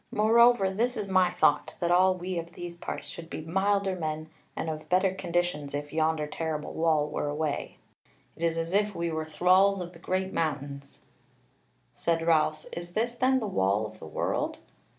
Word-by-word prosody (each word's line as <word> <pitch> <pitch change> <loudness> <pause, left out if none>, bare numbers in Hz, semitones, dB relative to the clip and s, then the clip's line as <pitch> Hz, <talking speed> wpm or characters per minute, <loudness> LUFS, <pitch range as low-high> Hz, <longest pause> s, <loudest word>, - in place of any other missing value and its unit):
Moreover 225 -2 +5
this 240 +5 0
is 205 -2 -3
my 185 -1 +4
thought, 150 -3 +2
that 175 -1 0
all 185 +1 +5
we 180 0 -3
of 170 +1 -8
these 175 0 -7
parts 170 - -6
should 165 -1 -9
be - - -5
milder 190 +3 +1
men 155 -2 -4 0.2
and - - -3
of 155 -1 -5
better 185 +1 +3
conditions, 175 -6 -2
if 145 0 -5
yonder 160 -1 +1
terrible 155 0 -4
wall 160 -2 +2
were 150 - -2
away. 150 0 -3 0.6
It - - -15
is 165 -1 +1
as 165 +2 -2
if 205 0 +2
we 170 0 -1
were 160 0 -2
thralls 185 +5 +4
of 175 0 -6
the 165 - -14
great 190 +2 -2
mountains." 140 -3 -3 0.9
Said 165 -1 0
Ralph, 155 -2 +2
"Is 175 0 -7
this 230 +4 0
then 260 +2 +2
the 225 - -3
Wall 105 - +1
of 105 - -10
the - - -9
World?" - - -2
170 Hz, 185 wpm, -28 LUFS, 155-190 Hz, 0.9 s, Moreover